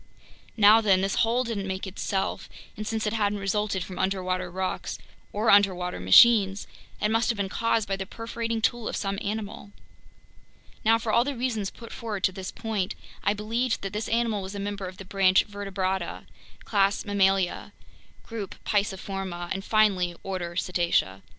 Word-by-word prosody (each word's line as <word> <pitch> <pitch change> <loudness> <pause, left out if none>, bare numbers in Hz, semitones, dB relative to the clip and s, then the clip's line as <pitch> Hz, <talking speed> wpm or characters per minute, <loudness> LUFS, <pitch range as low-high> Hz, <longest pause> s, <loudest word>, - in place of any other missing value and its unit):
Now 215 +1 +7
then, 195 -4 +4
this 195 +1 0
hole 235 +3 +2
didn't 215 -5 -3
make 190 +1 -3
itself, 190 0 -3 0.3
and 215 0 -6
since 220 -1 -1
it 210 - 0
hadn't 205 -2 +1
resulted 200 -1 -1
from 185 0 -8
underwater 185 -1 -1
rocks 185 +1 -3 0.3
or 215 +2 +2
underwater 185 - +3
machines, 195 - +6 0.3
it 210 - +1
must 225 +1 +2
have 230 - 0
been 200 -1 -1
caused 225 0 0
by 195 - -1
the 190 -1 -5
perforating 230 0 -4
tool 240 -1 +1
of - - -3
some 195 -1 -2
animal. 205 -1 -4 1.1
Now, 225 +1 +5
for 230 -1 -3
all 235 - +4
the 280 +1 -3
reasons 225 -5 -1
put 230 -1 -11
forward 215 -5 -5
to - - +3
this 185 0 -6
point, 215 -5 -3 0.3
I 205 - +2
believed 225 +3 -1
that 195 0 -4
this 210 +1 -3
animal 230 -3 +1
was 190 +1 -7
a - - -4
member 200 -1 -4
of 185 0 -9
the 195 - -9
branch 190 -1 +3
Vertebrata, 190 -3 -3 0.4
class 200 0 +1
Mammalia, 195 -2 +1 0.5
group 220 -5 -6
Pisciforma, 195 -3 -2
and 195 0 -2
finally, 195 -6 +2
order 180 -3 -4
Cetacea. 170 - 0
200 Hz, 170 wpm, -26 LUFS, 190-220 Hz, 1.1 s, Now